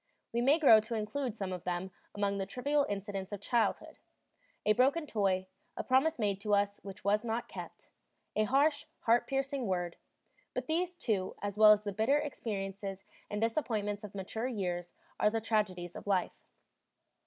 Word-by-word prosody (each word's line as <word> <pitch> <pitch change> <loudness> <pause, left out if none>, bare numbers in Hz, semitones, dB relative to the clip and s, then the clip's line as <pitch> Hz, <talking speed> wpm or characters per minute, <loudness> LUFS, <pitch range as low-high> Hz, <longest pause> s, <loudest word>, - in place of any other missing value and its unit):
We 235 - +1
may 275 +5 +5
grow 270 -9 +8
to 220 +2 -4
include 225 +3 -2
some 195 -4 -3
of 180 - -6
them 180 +1 -2 0.2
among 200 -1 0
the 190 - -2
trivial 285 +6 +1
incidents 200 -1 -4
of 205 - -4
childhood 230 +3 0 0.7
a 215 - +5
broken 275 +8 +3
toy, 195 -7 +1 0.3
a - - -2
promise 270 +5 +3
made 200 -4 0
to 205 0 +2
us 200 0 0
which 195 0 -9
was 210 +2 +2
not 235 +1 -2
kept, - - -9 0.4
a 215 - +3
harsh, 285 +5 +2
heart 235 +1 +3
piercing 270 -2 -1
word 175 -2 -1 0.6
but - - -2
these, 350 +3 0
too, 210 - -1
as 200 -1 -2
well 215 0 +8
as 210 0 +4
the 205 -1 -3
bitter 220 +8 +3
experiences 195 -8 -4 0.2
and 210 0 -3
disappointments 220 -4 -1
of 205 -1 -8
mature 220 +5 -3
years, 180 -7 -3 0.2
are 210 - +5
the 225 +1 -1
tragedies 205 -6 -1
of - - -9
life. 190 -3 0
210 Hz, 175 wpm, -32 LUFS, 195-250 Hz, 0.7 s, grow